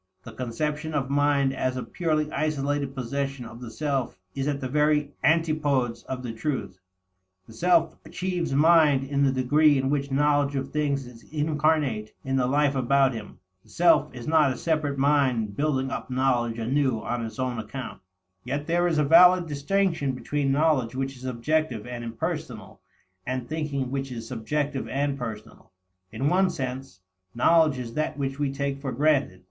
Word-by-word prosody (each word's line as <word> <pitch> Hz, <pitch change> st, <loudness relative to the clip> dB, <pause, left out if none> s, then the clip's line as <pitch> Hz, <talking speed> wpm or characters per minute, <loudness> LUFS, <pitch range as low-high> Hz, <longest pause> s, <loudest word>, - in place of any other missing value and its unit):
The 115 Hz, -, -9 dB
conception 150 Hz, +7 st, -3 dB
of 135 Hz, -1 st, -1 dB
mind 140 Hz, -1 st, +2 dB
as 130 Hz, -1 st, -1 dB
a 125 Hz, -, -3 dB
purely 155 Hz, -3 st, -1 dB
isolated 145 Hz, -2 st, -1 dB
possession 135 Hz, 0 st, -3 dB
of 115 Hz, +1 st, -11 dB
the 120 Hz, -, -7 dB
self 135 Hz, -4 st, -2 dB, 0.2 s
is 135 Hz, +1 st, -2 dB
at 145 Hz, -1 st, -1 dB
the 130 Hz, -, -3 dB
very 150 Hz, +1 st, +1 dB
antipodes 150 Hz, -6 st, +1 dB
of 130 Hz, -1 st, -5 dB
the 120 Hz, -2 st, -4 dB
truth. 115 Hz, -6 st, -4 dB, 0.7 s
The 110 Hz, -, -14 dB
self 170 Hz, +5 st, +2 dB
achieves 180 Hz, -4 st, -3 dB
mind 150 Hz, -1 st, +5 dB
in 140 Hz, +1 st, -1 dB
the 135 Hz, -, +3 dB
degree 145 Hz, +3 st, +3 dB
in 135 Hz, +1 st, 0 dB
which 140 Hz, -1 st, -1 dB
knowledge 145 Hz, 0 st, +2 dB
of 135 Hz, 0 st, -2 dB
things 140 Hz, -3 st, -1 dB
is 120 Hz, -2 st, -13 dB
incarnate 150 Hz, -7 st, 0 dB
in 135 Hz, 0 st, -1 dB
the 125 Hz, -2 st, +2 dB
life 145 Hz, +1 st, +2 dB
about 135 Hz, 0 st, +2 dB
him; 110 Hz, -3 st, -8 dB, 0.2 s
the -, -, -25 dB
self 175 Hz, -, +3 dB
is 120 Hz, -2 st, -9 dB
not 155 Hz, -3 st, +4 dB
a 125 Hz, -, -4 dB
separate 155 Hz, -4 st, -1 dB
mind 130 Hz, -7 st, +2 dB
building 135 Hz, -2 st, 0 dB
up -, -, -5 dB
knowledge 125 Hz, -3 st, +1 dB
anew 130 Hz, +1 st, 0 dB
on 120 Hz, -1 st, -2 dB
its 110 Hz, +3 st, -7 dB
own 130 Hz, -3 st, -2 dB
account. 115 Hz, +1 st, -7 dB, 0.4 s
Yet 145 Hz, +2 st, -3 dB
there 175 Hz, +2 st, +2 dB
is 165 Hz, -3 st, 0 dB
a 150 Hz, -, +3 dB
valid 175 Hz, +4 st, +7 dB
distinction 155 Hz, -1 st, 0 dB
between 140 Hz, +2 st, -1 dB
knowledge 140 Hz, -5 st, +2 dB
which 135 Hz, +1 st, -3 dB
is 130 Hz, 0 st, -11 dB
objective 130 Hz, -1 st, -1 dB
and 120 Hz, -1 st, -6 dB
impersonal, 115 Hz, -1 st, -5 dB, 0.5 s
and 130 Hz, -1 st, -3 dB
thinking 145 Hz, -5 st, -3 dB
which 135 Hz, -1 st, -3 dB
is 115 Hz, -2 st, -6 dB
subjective 135 Hz, +4 st, -2 dB
and 140 Hz, 0 st, -1 dB
personal. 110 Hz, -9 st, -8 dB, 0.4 s
In 135 Hz, -, -1 dB
one 185 Hz, +4 st, +3 dB
sense, 130 Hz, -, -5 dB, 0.3 s
knowledge 155 Hz, +2 st, +4 dB
is 120 Hz, -2 st, -6 dB
that 155 Hz, +1 st, -2 dB
which 135 Hz, 0 st, -3 dB
we 145 Hz, -2 st, 0 dB
take 140 Hz, 0 st, -3 dB
for 135 Hz, -2 st, -3 dB
granted. 140 Hz, -7 st, +1 dB
140 Hz, 175 wpm, -26 LUFS, 125-150 Hz, 0.7 s, valid